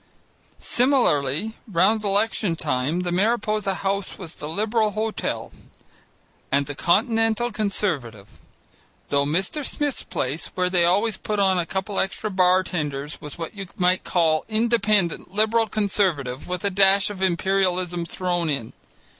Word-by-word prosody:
Similarly 220 - +1
round 205 +5 +3
election 205 -2 +1
time, 140 +4 -1
the 180 -1 -2
Mariposa 210 0 +1
House 195 0 -2
was 175 -4 -8
the 150 - -7
Liberal 215 +5 +1
Hotel, 220 +1 -3 1.0
and 140 +1 +2
the 145 - -5
Continental 225 - +1
Conservative, 165 - -2 0.8
though 140 0 +2
Mr. 190 - -1
Smith's 290 0 -1
place, 140 +6 -3
where 180 0 0
they 175 -2 +3
always 200 +4 +2
put 210 +2 -3
on 190 -2 +3
a 170 - -2
couple 190 +1 -2
of - - +4
extra 205 +2 -4
bar 185 0 +4
tenders, 150 -5 -4
was 150 - -9
what 165 -1 -6
you 195 -2 -7
might 180 0 +2
call 160 -3 +2
Independent 215 -5 +1
Liberal 220 +1 +3
Conservative, 185 - -1
with 180 +1 -3
a 200 - +1
dash 195 +1 +4
of 195 -2 -8
Imperialism 185 -1 +1
thrown 175 -3 -1
in. 135 -6 -3
190 Hz, 140 wpm, -23 LUFS, 170-215 Hz, 1.0 s, of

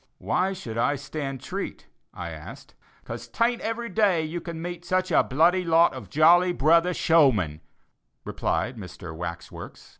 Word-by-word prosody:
"Why 185 +2 0
should 115 -11 -6
I 145 +5 +2
stand 140 -2 -5
treat?" 195 +1 -6 0.3
I - - -7
asked. - - -11 0.3
"'Cause - - -7
'tain't 235 +1 0
every 230 +1 -3
day 195 -5 +2
you 165 +2 -4
can 170 -1 -7
meet 175 +1 -6
such 185 +1 0
a - - +5
bloody 170 +7 +2
lot 165 0 +4
of - - -9
jolly 175 +4 +5
brother 170 +3 +3
showmen," 125 - +2 0.6
replied 125 0 -2
Mr. 90 -4 -9
Wax 85 0 -6
works. - - -11
165 Hz, 155 wpm, -25 LUFS, 135-180 Hz, 0.6 s, a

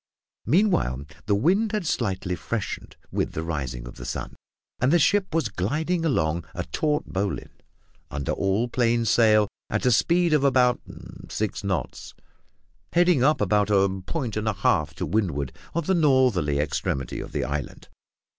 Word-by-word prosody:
Meanwhile, 155 - +2 0.2
the 100 - +3
wind 195 - +2
had 210 -4 -1
slightly 95 - -1
freshened 100 +6 -5 0.2
with - - -1
the 80 - -3
rising 65 -7 -4
of - - -11
the - - -8
sun, - - -5 0.4
and 130 +2 +2
the 175 - +6
ship 190 +4 +2
was 160 -6 +1
gliding 155 - -1
along 85 - +1
upon 85 - -10
a - - -2
taut 150 -1 0
bowline, 95 +2 -4 0.5
under 75 -3 -3
all 100 +5 0
plain 120 -1 +1
sail, 110 -2 +4 0.2
at - - -1
a 125 - +5
speed 170 +7 +3
of 150 -2 +3
about 125 -3 +3 0.5
six 110 -1 -3
knots, 95 -3 -3 0.8
heading 175 -6 +4
up 150 -2 +3
about 105 +1 +2
a 95 -2 +2
point 130 -10 -3
and 110 +1 -2
a 110 - +2
half 80 -6 +1
to - - -3
windward 80 -11 -1 0.2
of 170 -2 0
the 190 - +2
northern 130 - +3
extremity 70 -2 -1
of - - -7
the - - -1
island. - - -5
110 Hz, 165 wpm, -25 LUFS, 90-150 Hz, 0.8 s, the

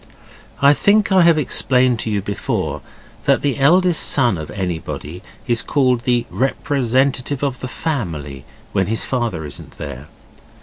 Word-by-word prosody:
I 140 +1 +7
think 205 +6 +2
I 190 -1 +5
have 170 -2 +5
explained 125 -4 +2
to 110 - -2
you 100 -2 -1
before 100 0 -3 0.4
that - - +2
the 140 -1 -1
eldest 175 +4 +4
son 125 -7 +3
of 80 -2 -7
anybody 90 -3 -5 0.2
is 120 -4 +2
called 125 -4 +1
the 120 -2 +1
representative 135 0 0
of 135 -3 -2
the 130 - -5
family 85 - -4 0.3
if 95 - +1
his 110 +1 0
father 115 - -2
isn't 75 - -10
there. 70 -1 -8
125 Hz, 145 wpm, -19 LUFS, 95-140 Hz, 0.4 s, I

